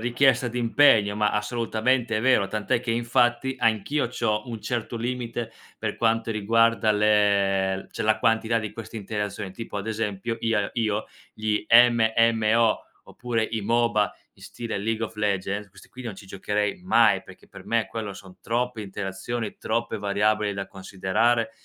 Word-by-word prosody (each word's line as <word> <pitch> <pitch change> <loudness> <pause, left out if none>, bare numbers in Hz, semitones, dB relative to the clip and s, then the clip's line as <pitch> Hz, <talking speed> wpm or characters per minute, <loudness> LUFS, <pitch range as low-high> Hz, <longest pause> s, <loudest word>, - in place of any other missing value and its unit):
richiesta 125 +1 +2
d'impegno, 115 -3 +4
ma 105 0 +1
assolutamente 115 +2 0
vero, 110 -5 +3
tant'è 110 +2 -1
che 120 - -3
infatti 120 +2 +1
anch'io 115 +4 +1
c'ho 115 -1 -2
un 115 -2 -6
certo 120 0 -3
limite 120 -1 -4 0.3
per - - -3
quanto 115 0 +1
riguarda 115 +1 +2
le 100 -2 +2
l 95 - -9
cioè - - -4
la 110 0 +2
quantità 115 0 +2
di 110 -2 -5
queste 115 0 -9
interazioni 105 -1 -4
tipo 110 +1 -7
ad 100 +1 -4
esempio 110 0 -3
ia 110 -3 0
io 110 -2 -1 0.3
gli 105 -1 -1
MMO 115 -1 +4 0.2
oppure 115 -2 -2
i 115 -1 -3
MOBA 110 -1 +1 0.2
in - - -18
stile 115 -1 -6
League 110 +2 -1
of 110 - -8
Legends, 100 -1 -2
questi - - -17
qui 130 - -11
non 115 -4 -5
ci 95 - -12
giocherei 105 - -2
mai, 120 -11 +4
perché - - -16
per - - -13
me 115 -1 +1
quello 105 -3 -5
son 95 -1 -13
troppe 120 0 -2
interazioni, 100 +3 -5
troppe 115 0 -2
variabili 105 +1 +1
da 100 -1 -4
considerare, 105 +5 0
110 Hz, 155 wpm, -25 LUFS, 105-115 Hz, 0.3 s, d'impegno